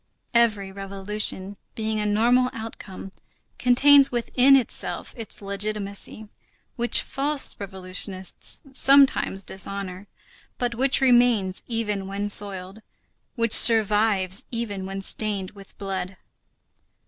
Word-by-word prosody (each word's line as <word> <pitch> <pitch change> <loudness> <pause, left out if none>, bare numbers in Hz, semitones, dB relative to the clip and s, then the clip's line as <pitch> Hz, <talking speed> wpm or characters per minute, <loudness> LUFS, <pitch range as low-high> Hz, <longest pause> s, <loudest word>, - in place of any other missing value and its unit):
Every 215 -5 +1
revolution, 195 0 -3 0.2
being 220 -1 -3
a 210 - -2
normal 240 +4 +2
outcome, 210 -4 -9 0.5
contains 275 +3 +5
within 250 +3 +3
itself 260 -3 -1
its 225 -3 -8
legitimacy, 200 +1 -4 0.5
which 240 0 +2
false 285 +1 0
revolutionists 190 -1 -4
sometimes 270 -8 +3
dishonor, 190 0 -3 0.5
but 245 -1 -2
which 265 +3 0
remains 240 -7 +2
even 210 -4 -3
when 200 +1 -4
soiled, 200 0 -1 0.5
which 230 -3 +1
survives 210 -4 +4
even 205 -5 -5
when 195 0 -6
stained 200 -1 -1
with 200 -1 -16
blood. 190 -1 -5
210 Hz, 100 wpm, -23 LUFS, 195-235 Hz, 0.5 s, contains